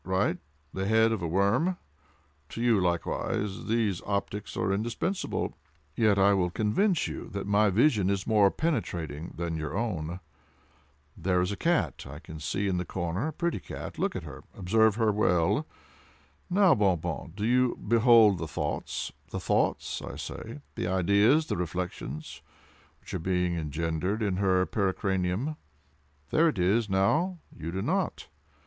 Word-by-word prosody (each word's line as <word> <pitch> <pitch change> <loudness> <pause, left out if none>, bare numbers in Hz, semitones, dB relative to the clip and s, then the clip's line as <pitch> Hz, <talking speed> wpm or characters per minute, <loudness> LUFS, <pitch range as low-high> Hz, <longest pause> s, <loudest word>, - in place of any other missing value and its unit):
—right—the 75 -2 -2
head 110 +1 +4
of 110 -4 -1
a 85 - -1
worm. 100 - +2 0.7
To - - -7
you, 115 -3 +3
likewise, 95 +4 -1
these 110 -5 +1
optics 100 0 -3
are 95 - +1
indispensable—yet 110 - -2
I 100 +1 +5
will 90 -2 +1
convince 140 - +1
you - - -6
that 100 -1 -3
my 105 +1 +3
vision 105 -2 +3
is 100 -1 -1
more 105 -3 +5
penetrating 85 - -2
than 85 -1 -2
your 80 +1 -3
own. 90 -7 -2 1.0
There 90 +1 +1
is 90 +2 0
a - - -2
cat 125 - 0
I 70 +2 -8 0.2
see 95 +6 -1
in 95 -2 0
the 90 - -1
corner—a 95 - -3
pretty 170 +2 -1
cat—look - - -4
at - - -4
her—observe 110 +3 0
her 110 -2 +2
well. 90 -5 +2 0.8
Now, 190 -1 +5
Bon 100 -7 +3
Bon, 80 - -5
do 105 +1 -2
you 125 +1 +3
behold 115 -3 +5
the 80 - -3
thoughts—the - - -4
thoughts, - - 0
I - - -7
say,—the 70 +4 -6
ideas—the 100 - +3
reflections—which 80 -3 -7
are 95 - -1
being 90 0 0
engendered 80 +6 -2
in 100 -3 0
her 95 -2 +3
pericranium? 95 +7 -1 0.7
There 165 +1 +4
it 120 - -4
is, 100 +5 +2
now—you 100 - 0
do 95 +2 -3
not! - - -1
100 Hz, 135 wpm, -28 LUFS, 90-110 Hz, 1.0 s, I